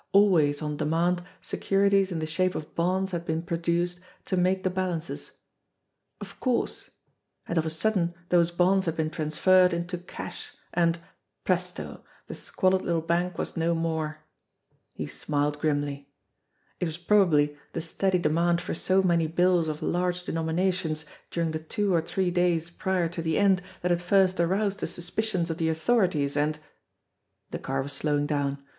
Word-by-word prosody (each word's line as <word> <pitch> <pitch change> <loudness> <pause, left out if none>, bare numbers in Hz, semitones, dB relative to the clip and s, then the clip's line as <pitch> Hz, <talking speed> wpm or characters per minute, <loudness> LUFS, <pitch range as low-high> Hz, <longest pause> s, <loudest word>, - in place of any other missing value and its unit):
Always 160 -8 +4
on 150 -1 -3
demand 170 +4 +1 0.2
securities 195 0 +2
in 170 - -2
the 160 - -2
shape 185 +4 0
of 150 - -6
bonds 185 +3 0
had 170 -2 -3
been 160 0 -2
produced 170 +1 -1 0.3
to 190 - -1
make 185 +1 +2
the 185 - +1
bal 185 0 -1
ances. 165 +1 -6 0.8
Of - - -10
course! 250 -3 -1 0.6
And 170 - -2
of 160 -1 +1
a - - 0
sudden 175 0 0
those 170 -1 +4
bonds 180 +2 +2
had 165 - 0
been 155 -1 0
transferred 180 +4 +3
into 170 +1 -3
cash, 180 - -7 0.2
and 170 -1 +2 0.5
presto! - - -2 0.2
the - - -7
squalid 185 -1 +1
little 165 -2 0
bank 175 +1 0
was - - -4
no 170 +1 +1
more! 160 -2 -2 0.7
He - - -5
smiled 145 0 -1
grimly. 145 -2 -1 0.7
It - - 0
was 160 0 -4
probably 170 -6 +3 0.2
the 165 - -2
steady 185 +3 0
demand 170 +1 +2
for - - -4
so 190 +3 +2
many 170 -3 +3
bills 175 0 +3
of 155 -1 -4
large 180 0 0
denominations 165 -1 -1 0.2
during 165 -2 -1
the 155 - -3
two 195 +5 -1
or 165 - +3
three 180 +2 -1
days 175 -2 +1
prior 185 -1 0
to 170 0 -4
the 160 -1 0
end 195 -3 +4 0.2
that 180 - +1
had 175 0 +1
first 185 0 +3
aroused 200 +4 +1
the - - -2
suspicions 175 +1 -2
of 165 - -5
the 160 -1 +1
authorities, 160 -5 +1
and 150 +1 +1 0.9
The - - -4
car 135 0 -2
was 140 +1 -6
slowing 145 +1 0
down. 145 -2 -1
170 Hz, 165 wpm, -27 LUFS, 160-185 Hz, 0.9 s, Always